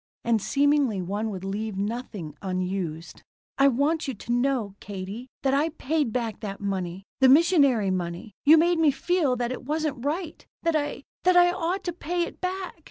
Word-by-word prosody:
And 230 -2 +2
seemingly 280 -4 +2
one 205 +5 -2
would 190 -3 -6
leave 205 +1 -3
nothing 205 -6 -4
unused. 185 -3 -3 0.4
"I 275 - +7
want 285 +5 +1
you 265 - -3
to 225 - -6
know, 245 -4 +1
Katie, 200 +5 -7 0.2
that 270 -1 +2
I 295 +4 +2
paid 300 -4 -1
back 230 -2 -2
that 200 -2 -6
money. 190 -2 -3 0.2
The 265 -1 +6
missionary 280 - +5
money. 180 +3 -4
You 310 +3 +8
made 340 +1 +3
me 320 -2 +5
feel 290 0 +1
that 240 0 -2
it 255 - -5
wasn't 295 -2 -2
right. 315 +3 -3 0.2
That 335 -1 +1
I 290 -2 -2 0.2
that 365 0 +5
I 355 0 +6
ought 360 +2 -2
to 350 - -3
pay 350 +1 -2
it - - -7
back. 370 -1 -4
255 Hz, 180 wpm, -26 LUFS, 200-315 Hz, 0.4 s, You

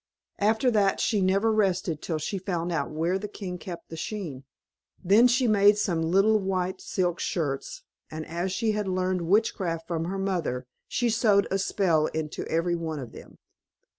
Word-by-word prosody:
After 220 +4 +2
that 200 -3 +2
she 210 -3 +1
never 195 +4 +2
rested 185 -6 0
till 160 - -2
she 155 +6 -3
had 185 - -10
found 175 -2 -1
out 165 - -1
where 165 +5 -1
the 210 - -5
king 185 -3 -6
kept 170 -1 -8
the 165 - -7
skein. 160 -9 -5 0.6
Then 210 +7 +6
she 250 +1 +2
made 205 -1 +5
some 180 -6 0
little 195 +6 +3
white 190 -1 -2
silk 180 -2 -1
shirts, 165 - -3 0.3
and 155 0 -6
as 175 +3 -3
she 220 +3 0
had 210 -1 -2
learned 185 -1 0
witchcraft 180 -5 +1
from 165 -2 -2
her 190 +3 -3
mother, 175 -10 -2 0.2
she 240 -1 0
sewed 210 -3 +3
a 195 - +1
spell 170 -5 +2
into 155 -1 -4
every 165 +2 0
one 160 -2 -4
of 125 -5 -7
them. - - -13
185 Hz, 180 wpm, -27 LUFS, 165-205 Hz, 0.6 s, Then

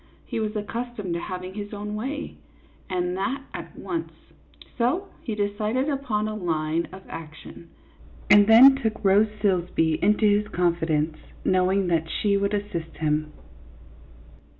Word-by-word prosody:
He - - -3
was 215 0 -2
accustomed 215 -2 -4
to 170 - -2
having 185 +1 -6
his 205 +1 -6
own 210 0 -5
way, 270 +8 -4 0.5
and 180 -1 -1
that 260 +8 -2
at - - -8
once; 335 -2 -4 0.6
so 310 +12 0
he 220 - -4
decided 210 +6 -1
upon 250 -7 -1
a 215 - -3
line 165 -4 -1
of 190 +1 -11
action, 160 +1 -10 0.6
and 205 -1 +7
then 250 +5 +9
took 220 -6 -3
Rose 200 +3 +5 0.2
Silsbee 175 -5 +1
into 210 +3 +3
his 210 0 +3
confidence, 165 -4 0 0.3
knowing 185 +1 +2
that 160 -1 0
she 200 +3 +1
would 200 +1 +1
assist 170 -6 -5
him. 155 -1 0
205 Hz, 140 wpm, -25 LUFS, 170-220 Hz, 0.6 s, then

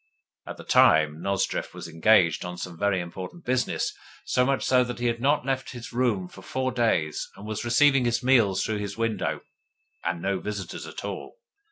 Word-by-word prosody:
At - - -7
the - - -10
time 80 0 +4
Nozdrev 100 0 -1
was - - -7
engaged 85 0 +3
on 90 0 -6
some 90 -1 -6
very 100 +2 +1
important 90 - -7
business 125 0 0 0.3
so 125 - +2
much 135 +1 +1
so 125 -1 +4
that 125 0 -5
he 120 - -3
had 115 -1 0
not 140 0 +2
left 135 -1 -2
his 120 -1 -9
room 115 -7 +1
for 95 - -13
four 130 +5 -2
days, 110 -11 0
and 100 - -11
was 110 0 -4
receiving 135 +2 +4
his 120 +1 0
meals 115 -7 +4
through 110 -1 -2
the 100 -1 -4
window, 110 -5 -1 0.6
and 85 - -1
no 95 +2 -1
visitors 100 -4 -5
at - - -7
all. - - -6
110 Hz, 190 wpm, -26 LUFS, 95-125 Hz, 0.6 s, time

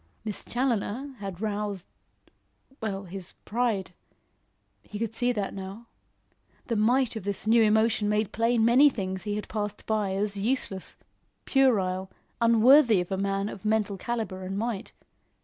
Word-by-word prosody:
Miss 210 -2 -4
Challoner 250 +2 -1
had 195 -2 -6
roused 205 -3 -3 1.0
well, 200 -3 -3
his 190 0 -7
pride. 220 -5 -1 0.9
He 210 - -8
could 225 0 -3
see 245 +2 +1
that 205 -5 -2
now. 195 +4 -8 0.8
The 230 - -1
might 240 +4 +2
of 220 - -5
this 200 +1 -3
new 230 +1 +5
emotion 220 0 +3
made 210 -1 0
plain 230 +1 +2
many 255 +5 +7
things 190 -6 -4
he 205 -1 -1
had 210 - -4
passed 210 -1 -4
by 210 -3 0
as 200 0 -1
useless, 205 -4 -2 0.5
puerile, 190 -9 +2 0.3
unworthy 230 0 +6
of 180 +1 -4
a - - +1
man 195 +1 -1
of 200 -2 -8
mental 215 -2 +1
calibre 220 -2 -3
and 190 +1 -4
might. 225 -1 -3
210 Hz, 150 wpm, -27 LUFS, 195-230 Hz, 1.0 s, many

